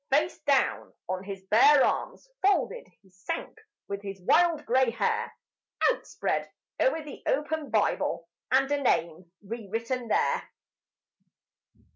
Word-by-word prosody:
Face 305 Hz, +5 st, +1 dB
down 280 Hz, -2 st, +1 dB
on 185 Hz, 0 st, -3 dB
his 195 Hz, -1 st, -7 dB
bare 265 Hz, +8 st, +6 dB
arms -, -, -2 dB
folded 405 Hz, +5 st, +1 dB, 0.2 s
he 190 Hz, -, -24 dB
sank 185 Hz, -, -5 dB, 0.3 s
with 200 Hz, 0 st, -4 dB
his 195 Hz, -1 st, -7 dB
wild 325 Hz, -, +3 dB
grey 255 Hz, +1 st, +3 dB
hair 230 Hz, -, -1 dB, 0.6 s
Outspread -, -, -3 dB, 0.3 s
o'er 325 Hz, -11 st, +2 dB
the 295 Hz, -2 st, -10 dB
open 300 Hz, +1 st, -1 dB
Bible -, -, 0 dB, 0.2 s
and 270 Hz, +2 st, +3 dB
a 290 Hz, -1 st, +1 dB
name 170 Hz, -, 0 dB
re 220 Hz, +1 st, -7 dB
written 230 Hz, +3 st, -3 dB
there. -, -, +1 dB
260 Hz, 125 wpm, -28 LUFS, 200-295 Hz, 0.6 s, bare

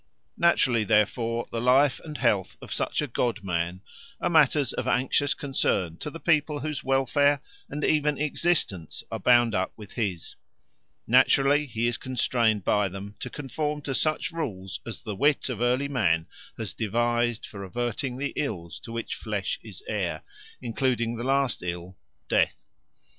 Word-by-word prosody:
Naturally, 130 Hz, -9 st, +4 dB
therefore, 115 Hz, +3 st, +1 dB
the 115 Hz, -, -2 dB
life 130 Hz, +2 st, +4 dB
and 150 Hz, -2 st, -6 dB
health 105 Hz, -7 st, +1 dB
of -, -, -7 dB
such -, -, -1 dB
a -, -, -2 dB
god 115 Hz, -3 st, -1 dB
man 90 Hz, 0 st, -2 dB, 0.4 s
are -, -, 0 dB
matters 150 Hz, -4 st, +4 dB
of -, -, -3 dB
anxious 135 Hz, +3 st, +2 dB
concern 95 Hz, -, 0 dB
to 150 Hz, -, -5 dB
the 165 Hz, -, -9 dB
people 150 Hz, -3 st, +2 dB
whose 150 Hz, -1 st, -3 dB
welfare 135 Hz, +2 st, +3 dB, 0.3 s
and 145 Hz, +1 st, -4 dB
even 150 Hz, -1 st, +2 dB
existence 150 Hz, -, -1 dB
are -, -, -3 dB
bound 120 Hz, -2 st, +5 dB
up 95 Hz, -1 st, 0 dB
with 105 Hz, -2 st, -11 dB
his; 95 Hz, -8 st, -3 dB, 0.7 s
naturally 145 Hz, +2 st, +4 dB
he 115 Hz, -2 st, -1 dB
is 120 Hz, 0 st, +1 dB
constrained 115 Hz, -4 st, +1 dB
by 105 Hz, -2 st, +2 dB
them 100 Hz, +2 st, -7 dB
to 125 Hz, -, -5 dB
conform 150 Hz, +2 st, -3 dB
to 135 Hz, -, -2 dB
such 155 Hz, +6 st, 0 dB
rules 100 Hz, -, -4 dB
as 115 Hz, -, -6 dB
the 105 Hz, -4 st, -4 dB
wit 145 Hz, +6 st, +2 dB
of 120 Hz, -3 st, -4 dB
early 125 Hz, +3 st, +2 dB
man 90 Hz, -12 st, +1 dB, 0.3 s
has -, -, -4 dB
devised 120 Hz, +1 st, 0 dB
for 100 Hz, -2 st, -8 dB
averting 120 Hz, +5 st, -3 dB
the 140 Hz, +1 st, -3 dB
ills 90 Hz, -, -3 dB
to 115 Hz, -, -9 dB
which 115 Hz, 0 st, -3 dB
flesh -, -, -3 dB
is 410 Hz, -, -10 dB
heir, -, -, -2 dB, 0.4 s
including 120 Hz, -1 st, 0 dB
the 120 Hz, -, -5 dB
last 135 Hz, -1 st, +1 dB
ill, 90 Hz, +1 st, -5 dB, 0.3 s
death. -, -, +1 dB
120 Hz, 160 wpm, -27 LUFS, 105-145 Hz, 0.7 s, bound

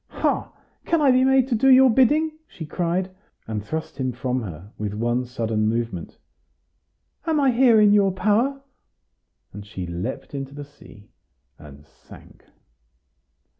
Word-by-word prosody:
"Ha! -, -, -2 dB, 0.3 s
can 335 Hz, -, +1 dB
I 285 Hz, -3 st, +4 dB
be 255 Hz, 0 st, +4 dB
made 265 Hz, -1 st, +3 dB
to -, -, 0 dB
do 270 Hz, +4 st, +3 dB
your 260 Hz, 0 st, +7 dB
bidding?" 295 Hz, +7 st, +3 dB, 0.2 s
she 160 Hz, -, -9 dB
cried, 175 Hz, +4 st, -2 dB, 0.4 s
and 105 Hz, -2 st, -4 dB
thrust 160 Hz, +2 st, -6 dB
him 130 Hz, -1 st, -1 dB
from 125 Hz, +1 st, -2 dB
her, 95 Hz, -1 st, -9 dB
with 105 Hz, -1 st, -5 dB
one 120 Hz, +3 st, -1 dB
sudden 115 Hz, -3 st, -2 dB
movement; 115 Hz, -6 st, -3 dB, 1.1 s
"am 315 Hz, -2 st, +1 dB
I 275 Hz, -2 st, +3 dB
here 240 Hz, -2 st, +5 dB
in 210 Hz, -1 st, +5 dB
your 200 Hz, -2 st, +4 dB
power?" 235 Hz, +8 st, 0 dB, 0.9 s
and 105 Hz, +1 st, -8 dB
she 95 Hz, -3 st, -7 dB
leaped 90 Hz, +13 st, -6 dB
into 135 Hz, 0 st, -6 dB
the 145 Hz, 0 st, -7 dB
sea, 105 Hz, -7 st, -18 dB, 0.5 s
and 75 Hz, 0 st, -14 dB
sank. -, -, -18 dB
145 Hz, 150 wpm, -23 LUFS, -, 1.1 s, your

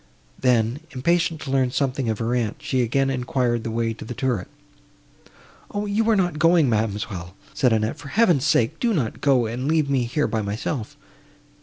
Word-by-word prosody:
Then, 120 Hz, 0 st, +2 dB
impatient 165 Hz, +3 st, 0 dB
to 135 Hz, -, -5 dB
learn 130 Hz, -2 st, +2 dB
something 130 Hz, -1 st, -1 dB
of 110 Hz, -, -1 dB
her 115 Hz, +2 st, -1 dB
aunt, 115 Hz, -4 st, 0 dB
she 135 Hz, -3 st, -1 dB
again 135 Hz, +3 st, +1 dB
enquired 125 Hz, -2 st, 0 dB
the -, -, -3 dB
way 115 Hz, 0 st, -1 dB
to 110 Hz, -, -10 dB
the 120 Hz, -, -7 dB
turret. 125 Hz, -8 st, -1 dB, 1.2 s
"O! 205 Hz, 0 st, -3 dB
you 215 Hz, +2 st, +1 dB
are 225 Hz, -, +5 dB
not 175 Hz, -6 st, 0 dB
going, 165 Hz, -2 st, +5 dB
ma'amselle," 105 Hz, -5 st, -2 dB, 0.2 s
said 125 Hz, -3 st, +2 dB
Annette, 110 Hz, 0 st, 0 dB
"for -, -, -10 dB
Heaven's 175 Hz, -, +3 dB
sake, 120 Hz, +8 st, +2 dB
do 235 Hz, -3 st, +1 dB
not 120 Hz, -9 st, -2 dB
go, 130 Hz, -4 st, +3 dB
and 120 Hz, +4 st, -3 dB
leave 155 Hz, -2 st, +1 dB
me 130 Hz, -3 st, +2 dB
here 145 Hz, +5 st, 0 dB
by 110 Hz, 0 st, -1 dB
myself." 105 Hz, +4 st, -4 dB
130 Hz, 185 wpm, -23 LUFS, 115-150 Hz, 1.2 s, are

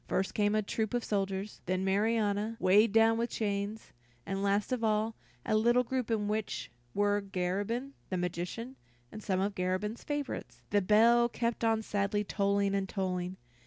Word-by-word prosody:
First 190 Hz, -, 0 dB
came 205 Hz, 0 st, +2 dB
a 215 Hz, -, +2 dB
troop 220 Hz, +2 st, -2 dB
of 240 Hz, -, 0 dB
soldiers, 195 Hz, 0 st, -2 dB
then 185 Hz, +1 st, 0 dB
Marianna, 210 Hz, +2 st, +1 dB
weighted 200 Hz, +4 st, +5 dB
down 225 Hz, +1 st, +4 dB
with 235 Hz, +1 st, 0 dB
chains, 205 Hz, 0 st, -3 dB, 0.3 s
and 195 Hz, 0 st, -2 dB
last 200 Hz, +3 st, +1 dB
of 250 Hz, -2 st, -1 dB
all, 215 Hz, +1 st, +1 dB, 0.3 s
a -, -, +1 dB
little 240 Hz, +3 st, +4 dB
group 255 Hz, -1 st, -2 dB
in 215 Hz, -2 st, 0 dB
which 215 Hz, -, -3 dB, 0.2 s
were 205 Hz, 0 st, +2 dB
Garabin, 200 Hz, +7 st, -2 dB, 0.2 s
the 185 Hz, -, -1 dB
magician, 180 Hz, +9 st, -4 dB, 0.3 s
and 215 Hz, -, -8 dB
some 190 Hz, -3 st, 0 dB
of 200 Hz, +2 st, 0 dB
Garabin's 185 Hz, +5 st, -2 dB
favorites. 290 Hz, -2 st, -4 dB
The 205 Hz, 0 st, +4 dB
bell 230 Hz, +4 st, +5 dB
kept 235 Hz, 0 st, -2 dB
on 225 Hz, -1 st, +2 dB
sadly 205 Hz, 0 st, 0 dB
tolling 200 Hz, 0 st, +1 dB
and 195 Hz, -1 st, -1 dB
tolling. 185 Hz, -2 st, -2 dB
210 Hz, 165 wpm, -31 LUFS, 195-225 Hz, 0.3 s, weighted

